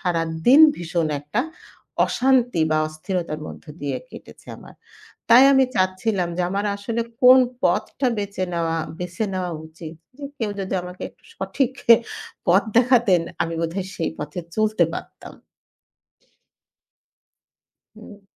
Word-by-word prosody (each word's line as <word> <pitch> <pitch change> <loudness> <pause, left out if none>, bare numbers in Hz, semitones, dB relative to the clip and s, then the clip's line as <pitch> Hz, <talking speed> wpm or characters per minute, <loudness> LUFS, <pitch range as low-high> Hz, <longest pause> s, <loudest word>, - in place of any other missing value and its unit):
সারাদিন 165 - +3 0.2
ভীষণ 170 -1 -2
একটা 150 +11 -2 0.7
অশান্তি 245 -8 +2
বা 155 - +2
অস্থিরতার 155 0 -4
মধ্য - - -10 0.2
দিয়ে 145 -1 -2
কেটেছে - - -14
আমার। - - -15 0.6
তাই 250 +3 +8
আমি 265 0 +5
চাচ্ছিলাম 185 0 0
যে - - +1
আমার 200 +2 -2
আসলে 225 +3 -3 0.2
কোন 255 +1 +8 0.2
পথটা 180 +9 0
বেঁচে 200 -2 -3
নেওয়া 165 -1 -1 0.2
বেছে 180 +4 -4
নেওয়া 185 -1 -3
উচিত। 160 0 -10 0.2
যে 290 - -7
কেউ 220 -3 -2
যদি 190 0 -4
আমাকে 180 +1 -10
একটু - - -32
সঠিক 270 -2 -1 0.8
পথ 185 +3 +5 0.2
দেখাতেন 240 -7 +4 0.2
আমি 165 - -4
বোধহয় 180 +3 -3
সেই 165 - -2
পথে 150 +4 -5 0.2
চলতে 215 -4 +2
পারতাম। - - -9 2.6
হু। 215 -1 -14
185 Hz, 125 wpm, -22 LUFS, 165-225 Hz, 2.6 s, তাই